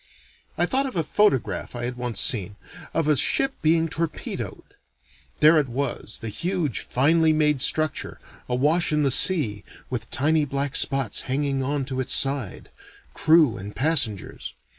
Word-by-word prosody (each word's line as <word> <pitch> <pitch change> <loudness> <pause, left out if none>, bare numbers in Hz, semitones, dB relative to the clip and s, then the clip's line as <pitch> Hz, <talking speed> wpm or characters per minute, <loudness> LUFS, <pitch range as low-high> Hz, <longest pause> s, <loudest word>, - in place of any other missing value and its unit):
I - - +3
thought 270 +1 0
of 260 - -8
a 165 - 0
photograph 130 - 0
I 120 - -5
had 125 0 -4
once 125 -2 -3
seen, 105 -7 +3 0.4
of 160 -2 -1
a 150 - +3
ship 270 - +2
being 165 +1 +2
torpedoed. 165 0 -5 0.8
There 155 +1 +6
it 140 -4 -2
was, 125 -3 -3
the 115 - -4
huge, 170 - -2
finely 160 +5 +2
made 150 -3 +1
structure, 155 +1 -1 0.3
awash 150 +8 +1
in 150 -1 +1
the 135 - +2
sea, 120 - +1 0.3
with 115 -4 -4
tiny 155 +3 +1
black 140 0 -3
spots 135 -6 +1
hanging 135 0 -1
on 140 +1 -2
to 130 -1 -5
its 130 0 +2
side 135 -7 0 0.4
crew 155 -7 +3
and 100 +2 -9
passengers. 130 - -1
140 Hz, 155 wpm, -23 LUFS, 125-160 Hz, 0.8 s, There